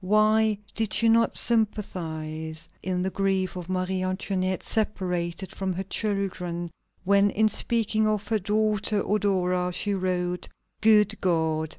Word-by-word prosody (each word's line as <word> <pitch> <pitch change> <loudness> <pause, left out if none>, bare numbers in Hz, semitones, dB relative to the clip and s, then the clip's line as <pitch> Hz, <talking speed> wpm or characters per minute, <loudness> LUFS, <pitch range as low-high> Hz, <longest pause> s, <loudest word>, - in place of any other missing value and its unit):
Why 215 +2 +3 0.2
did 220 -4 -2
she 230 - +3
not 230 0 +3
sympathize 160 -8 -1
in 180 -1 -1
the 190 - -1
grief 190 -1 0
of 180 -1 -7
Marie 185 0 -1
Antoinette, 185 0 -1
separated 180 -4 -2
from 190 -1 -2
her 185 +2 -3
children, 185 -4 -2 0.3
when 200 +1 +4
in 215 +2 +2
speaking 220 -1 +1
of 210 -1 -1
her 220 -1 +2
daughter 210 +1 +1
Eudora, 185 -3 +1
she 200 +3 -1
wrote: 180 -2 -1 0.3
"Good 215 -1 +4
God! 160 -3 +1
190 Hz, 130 wpm, -26 LUFS, 180-215 Hz, 0.3 s, when